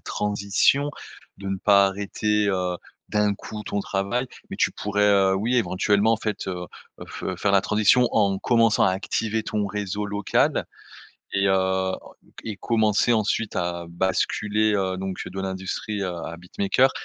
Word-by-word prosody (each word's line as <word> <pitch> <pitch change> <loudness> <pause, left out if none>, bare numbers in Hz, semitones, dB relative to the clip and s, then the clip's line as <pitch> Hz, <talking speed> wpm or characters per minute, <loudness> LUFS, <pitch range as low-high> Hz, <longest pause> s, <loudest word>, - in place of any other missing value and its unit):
transition. 105 +8 +1 0.5
De 100 - -8
ne 95 - -1
pas 100 0 +5
arrêter, 105 +1 0
heu, 90 -2 0 0.3
d'un 105 -1 +1
coup 105 +1 -8
ton 100 0 -2
travail, 100 +7 -1 0.2
mais - - -5
tu - - +3
pourrais, 105 0 0
heu, 95 -1 +4
oui, 115 +6 0
éventuellement 105 0 +2
en - - +2
fait, 105 -3 -3
heu, 90 -1 -4 0.3
heu, - - -6
fe 95 - -5
faire 100 +2 +1
la 100 - +5
transition 110 +4 +4
en 100 -3 +2
commençant 115 0 +3
à - - +4
activer 110 +3 -1
ton 105 -2 -2
réseau 105 0 -3
local 100 0 +1 0.7
et 100 0 +2
heu, - - +4
enc 95 0 0 0.4
et 110 -3 -5
commencer 110 +1 +2
ensuite 110 0 0
à 85 -1 -2
basculer, 105 +4 0
heu, 95 -2 0
donc 95 -1 -4
de 95 - -5
l'industrie 95 +2 -4
à 90 -2 -3
à 85 +1 -6
beatmaker. 100 +9 +1
100 Hz, 160 wpm, -24 LUFS, 95-105 Hz, 0.7 s, pas